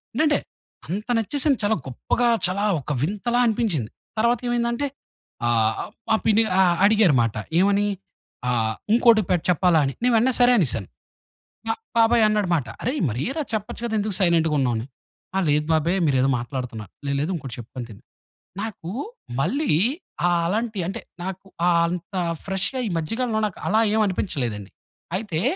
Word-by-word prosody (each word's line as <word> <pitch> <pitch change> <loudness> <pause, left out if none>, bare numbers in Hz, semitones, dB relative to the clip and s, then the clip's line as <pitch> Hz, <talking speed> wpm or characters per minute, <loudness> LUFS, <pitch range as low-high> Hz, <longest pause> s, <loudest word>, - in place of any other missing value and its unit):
ఏంటంటే, 300 +1 +3 0.5
అంత 200 +7 -4
నచ్చేసింది 275 +5 +1
చాలా 210 +2 +3
గొప్పగా, 235 - 0 0.2
చాలా 200 +3 -1 0.2
ఒక 150 - -5
వింతలా 210 +7 0
అనిపించింది. 205 - 0 0.3
తరవాతేమైందంటే, 240 +3 +1 0.6
ఆహ్, 110 -2 +3
అహ్, - - -7 0.2
మా 220 - +5
పిన్ని 220 +1 +4 0.2
అ - - +7 0.2
అడిగారుమాట. 165 - +4 0.2
ఏమని, 200 +1 +3 0.6
ఆహ్, 110 -2 0 0.2
ఇంకోటి 230 -2 +6
పె - - +4
చెప్పాలా 175 -1 +4
అని. 135 - -2
నేను 250 - +3
వెంట‌నే 250 +3 +3
సరే 245 0 +6
అనేశాను. 115 - 0 0.8
మా 225 - +2 0.2
బాబాయి 230 0 +5
అన్నాడుమాట, 180 -10 +1
"అరేయ్! 260 +5 -1
మరేరా, 215 - -2
చెప్పచ్చు 215 +2 -3
కదా, 230 - -3
ఎందుకు 205 -2 -1
సైలెంటుగున్నావు?" 160 - +2
అని. 110 - -4 0.5
ఆ! - - +2
లేదు 150 +1 +2
బాబాయి 160 +3 +2
మీరేదో 135 -1 +2
మాట్లాడుతున్నారు. 120 -4 -6 0.2
"లేదు, 140 0 0
లేదు, 165 +5 -1
ఇంకోటి 135 -7 -6
చెప్పుకొని 120 +1 -7
తిను." 105 - -12 0.6
నాకూ 200 -6 -6 0.5
మళ్ళీ 280 - 0 0.6
ఆ - - +3 0.2
అలాంటి 215 +2 -1
అంటే, 195 - -4 0.2
నాకు 190 +1 -6 0.2
ఆ - - +5 0.2
అంత 180 +3 -5 0.3
ఫ్రెష్‌గా, 195 +7 -1
ఈ - - -2
మధ్యకాలంలో, 225 +7 -1
నాకు 200 - -10
అలా 220 +3 +4
ఏం 220 - +3
అనిపించలేదండి. 120 - -3 0.5
అయితే 185 -6 -3
195 Hz, 145 wpm, -23 LUFS, 140-225 Hz, 0.8 s, అ